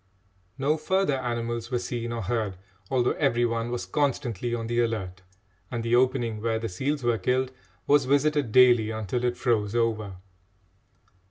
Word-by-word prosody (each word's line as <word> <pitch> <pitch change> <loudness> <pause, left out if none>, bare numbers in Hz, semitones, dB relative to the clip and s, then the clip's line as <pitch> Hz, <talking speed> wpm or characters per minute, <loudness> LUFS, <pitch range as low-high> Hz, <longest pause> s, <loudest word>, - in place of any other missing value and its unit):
No 145 +3 +1
further 175 -2 +1
animals 120 -1 -3
were 125 - 0
seen 120 -1 -4
or 115 -1 -3
heard, 105 -2 -2 0.3
although 125 -2 +2
every 120 -5 +2
one 115 0 -1
was 120 0 -3
constantly 120 -6 -1
on 115 -1 -4
the 120 +1 -1
alert, 95 -6 -3 0.5
and 120 -2 -3
the 115 +1 +2
opening 120 -4 +1
where 115 0 0
the 115 0 -3
seals 135 +9 -2
were 120 -2 +1
killed 130 +1 0 0.3
was 145 -1 +4
visited 145 -2 +2
daily 120 -3 +6
until 110 +2 -3
it 120 0 0
froze 110 -4 0
over. 110 -4 0
120 Hz, 160 wpm, -26 LUFS, 115-130 Hz, 0.5 s, daily